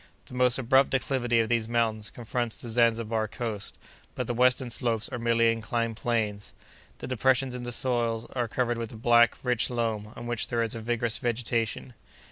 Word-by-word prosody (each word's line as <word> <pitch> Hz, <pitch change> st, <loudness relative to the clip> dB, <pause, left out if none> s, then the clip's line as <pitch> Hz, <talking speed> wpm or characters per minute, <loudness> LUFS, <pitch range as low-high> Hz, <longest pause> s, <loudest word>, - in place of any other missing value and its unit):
The -, -, -14 dB
most 125 Hz, -1 st, +3 dB
abrupt 135 Hz, +1 st, +4 dB
declivity 125 Hz, -3 st, +1 dB
of 110 Hz, -, -1 dB
these 115 Hz, -2 st, 0 dB
mountains 110 Hz, -2 st, 0 dB
confronts 120 Hz, 0 st, -3 dB
the 120 Hz, -, -8 dB
Zanzibar 115 Hz, -1 st, +2 dB
coast, 110 Hz, -2 st, -5 dB, 0.4 s
but -, -, -2 dB
the 120 Hz, -, -2 dB
western 125 Hz, +1 st, +2 dB
slopes 115 Hz, -4 st, 0 dB
are 130 Hz, -, -5 dB
merely 115 Hz, 0 st, +3 dB
inclined 115 Hz, 0 st, -2 dB
planes. 110 Hz, -3 st, -2 dB, 0.4 s
The -, -, -7 dB
depressions 130 Hz, +1 st, +2 dB
in 125 Hz, -, -4 dB
the 120 Hz, 0 st, -5 dB
soil 120 Hz, -2 st, 0 dB
are 120 Hz, -2 st, 0 dB
covered 120 Hz, 0 st, -1 dB
with 115 Hz, -1 st, -5 dB
a -, -, -9 dB
black, 120 Hz, +1 st, +5 dB
rich 125 Hz, -2 st, +1 dB
loam, 110 Hz, -3 st, -2 dB
on 120 Hz, -, -8 dB
which 120 Hz, -1 st, -2 dB
there 115 Hz, -1 st, 0 dB
is 115 Hz, -, -2 dB
a 115 Hz, -, -5 dB
vigorous 120 Hz, 0 st, -1 dB
vegetation. 120 Hz, -1 st, -2 dB
120 Hz, 185 wpm, -27 LUFS, 115-125 Hz, 0.4 s, black